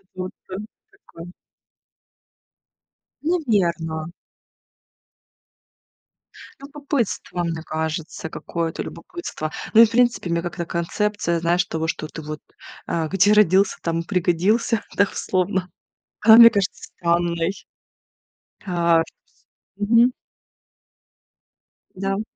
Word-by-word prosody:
Он 185 0 -4 0.6
такой. 175 - -13 1.9
Наверно. 175 - 0 2.5
Любопытство, 275 -10 -3
мне 165 -1 -3
кажется, 160 0 -4
какое-то 165 0 -4
любопытство. 345 - -6 0.2
Ну 225 - +9
и, - - +10
в - - -8
принципе, 235 -6 +2
мне 170 0 0
как-то 170 -1 -4
концепция, 170 0 -1
знаешь, 175 +2 +2
того, 160 0 -3
что 155 -1 -3
ты 160 - -8
вот, 155 0 -6 0.5
а, 160 -2 -1
"где 195 +3 +3
родился, 200 -2 +4
там 165 0 -1
пригодился" 190 +6 +1
дословно. 190 -1 0 0.5
Она 220 +1 +8
мне 230 0 +10
кажется 200 -4 -2
странной. 170 +1 0 1.1
А 170 -3 +3 0.8
мгм. 230 +4 +4 1.8
Да, 195 +1 -3
м. 210 - -2
180 Hz, 90 wpm, -22 LUFS, 165-210 Hz, 2.5 s, и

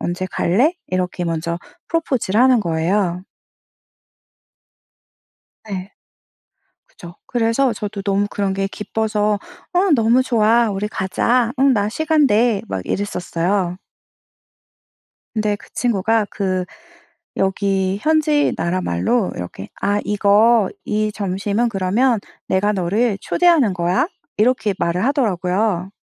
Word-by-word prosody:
언제 180 +2 -3
갈래?" 245 - +2
이렇게 180 -1 -2
먼저 170 0 -2 0.3
프로포즈를 260 - 0
하는 255 -2 +5
거예요. 175 +1 0 2.4
네. 195 -2 -6 1.0
그쵸. 170 0 -13
그래서 240 +2 +1
저도 205 -1 -5
너무 200 +1 +1
그런 200 -1 -1
게 195 0 -1
기뻐서 210 0 -1 0.3
"어 370 +2 +2
너무 235 +1 +3
좋아. 230 -2 +3
우리 200 +1 -2
가자. 230 +5 0
응 270 0 +5
나 205 -3 +1
시간 310 +4 +2
돼." 225 -2 +2
막 95 -1 -3
이랬었어요. 180 -1 -1 1.6
근데 210 -1 0
그 - - -17
친구가 225 -2 +1
그 185 -2 -1 0.7
여기 195 0 0
현지 305 -1 +2
나라말로 185 - 0
이렇게 90 +2 -7
"아 205 0 +1
이거 210 +1 +3
이 215 0 0
점심은 200 +4 -1
그러면 210 +5 +1 0.3
내가 205 +2 +2
너를 200 +3 0
초대하는 330 - +3
거야." 175 - +1 0.3
이렇게 215 -2 +2
말을 170 +3 0
하더라고요. 195 -7 0
205 Hz, 235 characters per minute, -19 LUFS, 185-235 Hz, 2.4 s, 하는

